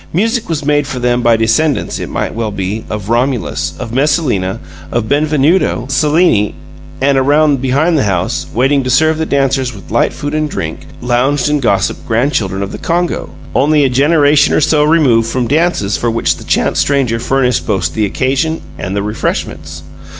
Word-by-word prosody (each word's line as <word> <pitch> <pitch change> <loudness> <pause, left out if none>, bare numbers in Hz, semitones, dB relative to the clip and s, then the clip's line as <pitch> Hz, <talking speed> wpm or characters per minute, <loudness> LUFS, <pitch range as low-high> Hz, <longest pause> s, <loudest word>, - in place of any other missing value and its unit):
Music 225 +6 0
was 150 -3 -2
made 145 -1 +1
for 130 - -5
them 125 0 0
by 120 -2 +3
descendants, 120 +7 0
it - - -5
might - - -3
well 115 -1 -2
be, 100 +2 -4
of 105 -2 -5
Romulus, 120 +1 -1
of 115 -3 -7
Messalina, 130 - 0 0.3
of 115 -2 -1
Benvenuto 150 -1 +1
Cellini, 145 - +2 0.4
and, 135 0 +2
around 145 0 +2
behind 140 +6 +1
the 140 - +1
house, 85 -5 -1
waiting 135 +3 +1
to 130 - -3
serve 155 +4 +2
the 160 - -1
dancers 135 -3 0
with 100 - -13
light 115 - +2
food 145 0 -5
and 155 0 -1
drink, 80 - -5
lounged 130 +4 +1
and 150 -1 0
gossiped 100 -6 0
grandchildren 110 -5 0
of 100 - -5
the - - -7
Congo, 175 0 -1 0.2
only 150 +1 +3
a 135 - +2
generation 145 +2 +3
or - - +3
so 150 0 +3
removed 135 -8 +3
from 125 0 -1
dances 150 - +1
for 120 - -1
which 115 0 +1
a - - -11
chance - - 0
stranger 135 -5 +1
furnished 125 0 0
both 90 -7 -1
the 110 - 0
occasion 135 +8 -1 0.2
and 95 +2 -4
the 100 - -1
refreshments. 80 -7 -4
130 Hz, 180 wpm, -14 LUFS, 110-150 Hz, 0.4 s, by